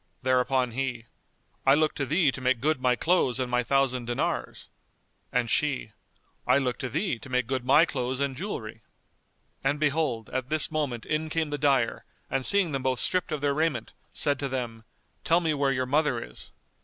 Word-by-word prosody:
Thereupon 130 Hz, 0 st, +2 dB
he, 125 Hz, -2 st, -3 dB, 0.6 s
"I 135 Hz, +1 st, +5 dB
look 155 Hz, 0 st, +2 dB
to 140 Hz, -, -3 dB
thee 155 Hz, -1 st, +3 dB
to 130 Hz, -, -7 dB
make 130 Hz, -1 st, +1 dB
good 150 Hz, +1 st, 0 dB
my 125 Hz, -1 st, +3 dB
clothes 135 Hz, -4 st, +1 dB
and 125 Hz, -1 st, -2 dB
my 125 Hz, 0 st, +2 dB
thousand 130 Hz, -1 st, +1 dB
dinars;" 120 Hz, 0 st, -3 dB, 0.6 s
and 125 Hz, -1 st, +1 dB
she, 130 Hz, -3 st, 0 dB, 0.6 s
"I -, -, +5 dB
look 130 Hz, -3 st, -1 dB
to 130 Hz, -, -3 dB
thee 155 Hz, -, -1 dB
to 135 Hz, -, -10 dB
make 125 Hz, -1 st, +1 dB
good 130 Hz, +1 st, -2 dB
my 140 Hz, +6 st, +5 dB
clothes 130 Hz, -3 st, -3 dB
and 140 Hz, -1 st, -1 dB
jewellery." 115 Hz, -, -6 dB, 0.8 s
And, 140 Hz, +2 st, 0 dB
behold, 145 Hz, -7 st, 0 dB
at 130 Hz, 0 st, -3 dB
this 155 Hz, 0 st, +1 dB
moment 140 Hz, -7 st, -2 dB
in 155 Hz, +1 st, -2 dB
came 160 Hz, -1 st, -1 dB
the 145 Hz, -, -3 dB
dyer 135 Hz, -5 st, +1 dB, 0.3 s
and 135 Hz, -1 st, 0 dB
seeing 200 Hz, +1 st, +6 dB
them 135 Hz, -1 st, -2 dB
both 130 Hz, -1 st, 0 dB
stripped 185 Hz, -1 st, 0 dB
of 150 Hz, -2 st, -2 dB
their 145 Hz, -1 st, +1 dB
raiment, 150 Hz, -6 st, -1 dB, 0.2 s
said 145 Hz, -3 st, +1 dB
to 140 Hz, -, -1 dB
them, 120 Hz, -4 st, -4 dB, 0.4 s
"Tell 165 Hz, +1 st, +3 dB
me 165 Hz, -3 st, 0 dB
where 140 Hz, -2 st, +1 dB
your 130 Hz, -1 st, 0 dB
mother 150 Hz, +4 st, +1 dB
is." -, -, -10 dB
135 Hz, 190 wpm, -27 LUFS, 125-150 Hz, 0.8 s, seeing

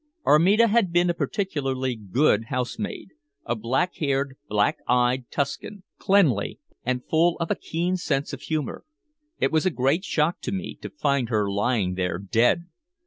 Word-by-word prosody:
Armida 195 Hz, +10 st, +5 dB
had 220 Hz, -4 st, +2 dB
been 175 Hz, 0 st, +3 dB
a -, -, -2 dB
particularly 135 Hz, -, -2 dB
good 110 Hz, +2 st, +1 dB
housemaid, 125 Hz, -, -4 dB, 0.4 s
a 120 Hz, -, -1 dB
black 130 Hz, +11 st, 0 dB
haired, 140 Hz, -2 st, -1 dB
black 105 Hz, -1 st, +1 dB
eyed 125 Hz, 0 st, +2 dB
Tuscan, 180 Hz, +8 st, -3 dB
quick, -, -, -48 dB
cleanly, 160 Hz, -, +3 dB, 0.2 s
and 125 Hz, 0 st, -2 dB
full 165 Hz, +2 st, +3 dB
of 170 Hz, -, -2 dB
a -, -, +2 dB
keen 175 Hz, +3 st, -2 dB
sense 145 Hz, -5 st, -2 dB
of 135 Hz, -, -6 dB
humor. 155 Hz, -3 st, -3 dB, 0.6 s
It -, -, +2 dB
was 160 Hz, +3 st, +2 dB
a -, -, +5 dB
great 145 Hz, +4 st, +1 dB
shock 160 Hz, -2 st, 0 dB
to -, -, -4 dB
me 195 Hz, 0 st, -4 dB
to -, -, -6 dB
find 140 Hz, -5 st, 0 dB
her 105 Hz, -3 st, +1 dB
lying 100 Hz, -2 st, 0 dB
there 90 Hz, -2 st, -1 dB
dead. 115 Hz, -, +2 dB
140 Hz, 165 wpm, -25 LUFS, 120-175 Hz, 0.6 s, Armida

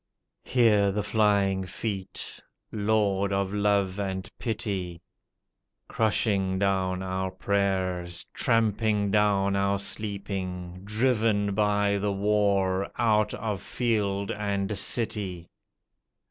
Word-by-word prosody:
Hear 105 Hz, -5 st, +3 dB
the 105 Hz, +1 st, -1 dB
flying 100 Hz, -2 st, +2 dB
feet! 95 Hz, 0 st, -5 dB, 0.3 s
Lord 100 Hz, -2 st, +1 dB
of 100 Hz, 0 st, -1 dB
love 100 Hz, -2 st, +1 dB
and 95 Hz, -1 st, -3 dB
pity! 100 Hz, -7 st, -3 dB, 0.9 s
Crushing 100 Hz, -3 st, +1 dB
down 95 Hz, -1 st, 0 dB
our 95 Hz, 0 st, -2 dB
prayers, 95 Hz, -2 st, -1 dB
tramping 110 Hz, -2 st, +1 dB
down 100 Hz, -2 st, +2 dB
our 100 Hz, 0 st, +1 dB
sleeping, 95 Hz, -3 st, -4 dB
Driven 110 Hz, -2 st, +1 dB
by 105 Hz, -1 st, +2 dB
the 100 Hz, +1 st, 0 dB
war 100 Hz, -1 st, +1 dB
out 105 Hz, -2 st, +2 dB
of 105 Hz, -4 st, -3 dB
field 100 Hz, -5 st, -1 dB
and 100 Hz, 0 st, -2 dB
city. 95 Hz, -5 st, -1 dB
100 Hz, 95 wpm, -27 LUFS, 95-105 Hz, 0.9 s, Hear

